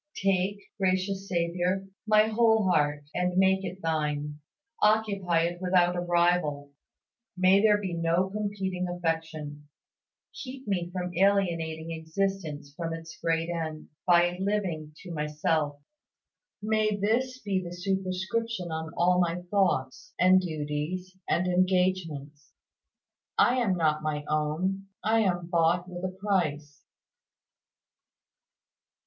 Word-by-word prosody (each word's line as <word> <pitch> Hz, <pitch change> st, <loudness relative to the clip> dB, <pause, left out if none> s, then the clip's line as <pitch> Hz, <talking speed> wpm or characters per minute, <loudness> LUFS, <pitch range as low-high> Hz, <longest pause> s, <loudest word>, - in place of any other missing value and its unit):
Take, 195 Hz, +1 st, 0 dB
gracious 190 Hz, +1 st, 0 dB
Saviour, 180 Hz, +2 st, 0 dB, 0.2 s
my 215 Hz, 0 st, +5 dB
whole 220 Hz, -2 st, +3 dB
heart, 145 Hz, -2 st, +1 dB
and 180 Hz, 0 st, 0 dB
make 190 Hz, 0 st, +4 dB
it 185 Hz, 0 st, -6 dB
Thine; 150 Hz, -2 st, -1 dB, 0.4 s
occupy 200 Hz, -5 st, +2 dB
it 175 Hz, +1 st, -2 dB
without 180 Hz, -1 st, +3 dB
a -, -, -1 dB
rival. 175 Hz, -5 st, +1 dB, 0.7 s
May 185 Hz, +2 st, +5 dB
there 210 Hz, -1 st, +5 dB
be 190 Hz, -4 st, -4 dB
no 170 Hz, +2 st, +1 dB
competing 195 Hz, -3 st, -2 dB
affection. 160 Hz, -4 st, -3 dB, 0.6 s
Keep 260 Hz, -1 st, -8 dB
me 180 Hz, -4 st, -1 dB
from 180 Hz, -1 st, -4 dB
alienating 170 Hz, -4 st, +1 dB
existence 160 Hz, -3 st, -3 dB
from 165 Hz, +1 st, -3 dB
its 165 Hz, 0 st, -9 dB
great 165 Hz, 0 st, 0 dB
end, 160 Hz, -2 st, -4 dB, 0.2 s
by 175 Hz, 0 st, +4 dB
living 190 Hz, -6 st, -1 dB
to 180 Hz, -, -8 dB
myself. 150 Hz, -1 st, -1 dB, 0.8 s
May 215 Hz, -1 st, +2 dB
this 235 Hz, +6 st, 0 dB
be 195 Hz, -6 st, -2 dB
the 175 Hz, -, -6 dB
superscription 190 Hz, +2 st, -2 dB
on 160 Hz, 0 st, -4 dB
all 180 Hz, +1 st, +4 dB
my 175 Hz, 0 st, 0 dB
thoughts, 195 Hz, -, 0 dB
and 185 Hz, +1 st, +6 dB
duties, 160 Hz, +3 st, -4 dB
and 180 Hz, -, +2 dB
engagements 180 Hz, -6 st, 0 dB, 0.8 s
"I 250 Hz, -, +4 dB
am 210 Hz, -7 st, +1 dB
not 155 Hz, -2 st, +2 dB
my 150 Hz, -1 st, -2 dB
own, 165 Hz, +6 st, -1 dB, 0.2 s
I 225 Hz, +2 st, +3 dB
am 180 Hz, -5 st, +1 dB
bought 170 Hz, +1 st, +2 dB
with 180 Hz, 0 st, -7 dB
a 185 Hz, -, 0 dB
price." 155 Hz, -8 st, -1 dB
180 Hz, 120 wpm, -28 LUFS, 160-195 Hz, 0.8 s, and